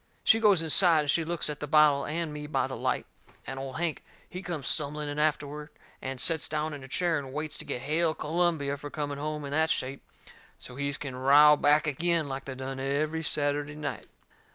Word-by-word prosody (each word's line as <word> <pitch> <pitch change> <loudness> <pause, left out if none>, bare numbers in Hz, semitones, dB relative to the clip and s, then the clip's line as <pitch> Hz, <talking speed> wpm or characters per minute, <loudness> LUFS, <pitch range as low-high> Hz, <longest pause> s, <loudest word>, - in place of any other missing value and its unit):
She 225 - +5
goes 205 -6 +4
inside 165 0 +5
and 145 -1 +1
she 165 - +1
looks 170 0 -1
at 150 -1 -4
the 150 - -4
bottle 150 -2 +4
and 160 0 -3
me 150 0 -6
by 150 - 0
the - - -5
light, - - -1 0.4
and 135 0 -6
Old 135 -1 -6
Hank, 170 -2 -2 0.2
he 180 - -7
comes 170 -7 -5
stumbling 150 0 -1
in 145 +1 -4
afterward 150 0 -1 0.3
and 130 -1 -5
sets 160 +2 +3
down 155 0 -2
in 140 -2 -8
a - - -9
chair 165 +2 0
and 135 -2 -8
waits 150 +2 -4
to - - -5
get 125 - -4
Hail 155 +3 +1
Columbia 155 -3 0
for 145 +1 -8
coming 145 -1 -4
home 150 0 -4
in 140 - -6
that 160 +2 +1
shape, 135 -1 -2 0.6
so's 125 +2 -10
he 140 0 -1
can 140 -3 -5
row 145 +3 +6
back 150 +1 +3
agin, 165 +2 0
like 135 0 -5
they 135 - -6
done 130 0 -6
every 150 +4 -1
Saturday 145 -1 -1
night. 150 -1 -5
150 Hz, 215 wpm, -28 LUFS, 140-160 Hz, 0.6 s, row